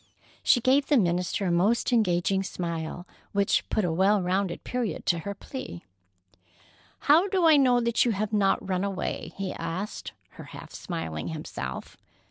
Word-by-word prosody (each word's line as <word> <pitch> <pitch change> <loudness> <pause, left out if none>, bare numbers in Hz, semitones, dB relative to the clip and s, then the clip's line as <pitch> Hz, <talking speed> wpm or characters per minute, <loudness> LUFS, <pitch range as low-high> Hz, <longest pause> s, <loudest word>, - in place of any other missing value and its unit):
She 245 - +4
gave 275 +3 +3
the 290 - +4
minister 180 -1 0
a 180 - +1
most 205 +9 +2
engaging 190 -3 +2
smile, 170 -2 -4 0.3
which 200 -1 +1
put 215 - +1
a 170 - 0
well 195 +4 +3
rounded 185 0 -1
period 240 -9 -3
to 170 - +2
her 200 +5 -5
plea. 190 - -8 1.2
"How 325 +7 +5
do 375 -3 +1
I 320 -2 +7
know 255 -4 +4
that 235 0 +2
you 245 - +1
have 210 +2 -2
not 195 -2 +2
run 185 0 0
away?" 195 -2 -3
he 195 -1 -3
asked 170 +6 -5 0.2
her, - - -12
half - - -11
smiling 120 - -5
himself. 110 - -6
195 Hz, 160 wpm, -27 LUFS, 175-235 Hz, 1.2 s, I